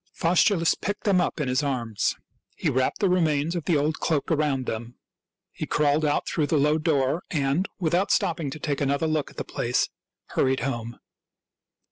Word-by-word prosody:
Faustulus 170 0 +3
picked 205 +1 -4
them 195 -3 +3
up 170 - -2
in 150 - -1
his 130 +2 +1
arms. 120 -7 -1 0.4
He - - 0
wrapped 130 +1 0
the 200 - +4
remains 165 -3 +1
of 170 - -3
the 165 - +3
old 150 +2 0
cloak 155 -2 0
around 145 -4 +1
them. 115 +2 -5 0.6
He - - -5
crawled 150 +1 +2
out 145 -1 +1
through 155 -3 0
the 155 - +2
low 150 +2 +3
door 150 0 +1
and, 145 +4 0
without 175 +3 +1
stopping 165 -4 +1
to 155 - -7
take 145 -1 -2
another 140 +2 +1
look 155 -2 0
at - - -18
the - - -2
place, - - -1 0.4
hurried 130 -1 +1
home. 120 -2 -3
150 Hz, 180 wpm, -25 LUFS, 135-165 Hz, 0.6 s, the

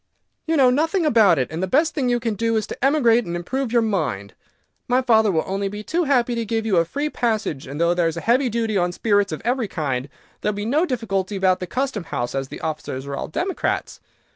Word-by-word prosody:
"You 325 0 +2
know 260 -3 +5
nothing 325 +6 +1
about 215 - +5
it, 130 +1 -1
and 160 +2 -4
the 190 - 0
best 305 - +2
thing 260 -4 0
you 240 0 +2
can 230 -2 -1
do 230 +2 0
is 215 - -1
to - - -8
emigrate 245 -5 +4
and 175 -4 -5
improve 245 +8 -3
your 235 -1 +3
mind. 145 - -2 0.5
My 250 +1 +2
father 220 -4 +4
will 160 -3 +1
be - - -15
only 200 +2 -3
too 340 +8 0
happy 250 -4 +2
to 235 -1 -1
give 225 0 -2
you 200 -5 +2
a 170 - +4
free 285 - -2
passage, 220 - -2
and 140 +3 -6
though 170 +1 +3
there 175 -1 +1
is 165 0 -3
a - - -3
heavy 250 +3 +2
duty 225 -1 -1
on 175 0 0
spirits 205 -1 +1
of - - -5
every 245 -2 0
kind, 140 -6 -3 0.3
there 210 - +1
will - - -7
be 205 - -3
no 300 +10 +2
difficulty 205 -6 -2
about 190 -1 +2
the 180 - -5
Custom 255 -6 -2
House, 120 -6 -3
as 135 -1 -2
the - - -9
officers 150 -4 -4
are 140 0 -4
all - - -4
Democrats. 365 - -2
220 Hz, 245 wpm, -22 LUFS, 175-250 Hz, 0.5 s, know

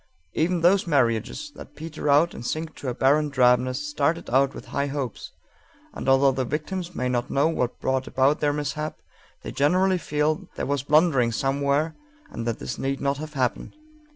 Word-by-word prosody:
Even 170 +2 +1
those 185 +2 +4
marriages 130 - 0
that - - -12
peter 155 -1 -5
out 150 +4 +4
and - - -8
sink 155 +5 -3
to 140 - -8
a - - -2
barren 145 +4 +3
drabness 130 +1 +2
started 150 +1 -1
out 135 +2 +3
with - - -9
high 140 0 0
hopes, 135 -4 -5 0.6
and, - - -3
although 135 +1 +5
the 130 0 -1
victims 170 +6 -4
may 125 - -1
not 120 -1 -1
know 140 +3 +2
what 125 -7 -2
brought 130 0 -1
about 135 +3 +2
their 145 -1 +2
mishap, 150 +1 -3 0.5
they - - -5
generally 185 +6 +2
feel 150 0 -1
there - - -3
was 140 -1 0
blundering 145 -4 +3
somewhere 140 +5 0 0.4
and 115 0 -5
that 115 - -1
this - - -6
need 135 0 -2
not 140 0 0
have 155 0 -7
happened. 130 - -2
140 Hz, 180 wpm, -25 LUFS, 130-155 Hz, 0.6 s, although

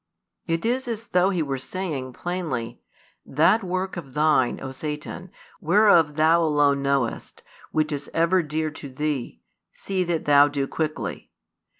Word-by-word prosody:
It 165 +4 -1
is 250 +2 0
as 230 -2 -3
though 180 +1 +3
He 180 -4 0
were 135 -2 -3
saying 140 -5 -4
plainly: 165 -11 -4 0.4
"That 170 +10 +3
work 185 0 -3
of 140 -6 -9
thine, 150 -5 +2
O 130 - -6
Satan, 150 +6 -6 0.3
whereof 170 -4 +4
thou 160 +2 +4
alone 145 -3 +2
knowest, 140 -4 -2
and - - -38 0.3
which 155 0 0
is 145 -1 -4
ever 170 +3 +2
dear 155 0 -2
to 145 -1 -9
thee, 140 -1 -3 0.3
see 190 -2 -2
that 170 -2 -2
thou 145 0 +6
do 140 -1 -2
quickly. 155 +2 -4
155 Hz, 155 wpm, -24 LUFS, 140-180 Hz, 0.4 s, thou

